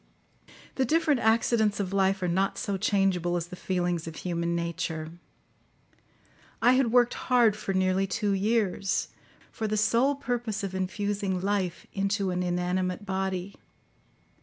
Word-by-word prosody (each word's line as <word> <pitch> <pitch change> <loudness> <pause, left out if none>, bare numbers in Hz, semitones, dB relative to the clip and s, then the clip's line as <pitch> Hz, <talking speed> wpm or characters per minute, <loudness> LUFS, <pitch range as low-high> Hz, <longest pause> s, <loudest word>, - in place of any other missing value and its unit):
The 265 - +3
different 305 0 +2
accidents 220 -2 +2
of 195 -1 -2
life 195 0 +2
are - - +1
not 190 +3 0
so 200 - -2
changeable 190 -3 +1
as 170 - -3
the 180 - -7
feelings 175 -3 -2
of 165 - -7
human 170 -1 -2
nature. 170 -2 -3 1.5
I 240 +2 +5
had 255 -2 +3
worked 245 0 +4
hard 240 -4 +3
for 210 -2 -4
nearly 185 +1 +2
two 205 +2 -1
years, 200 -1 0 0.4
for 220 - -3
the 215 0 -1
sole 235 +6 +3
purpose 240 -6 -3
of 195 -1 -3
infusing 190 +1 -2
life 190 -2 -1
into 195 -1 0
an 180 0 -1
inanimate 180 +2 -1
body. 190 0 -2
195 Hz, 140 wpm, -27 LUFS, 180-220 Hz, 1.5 s, I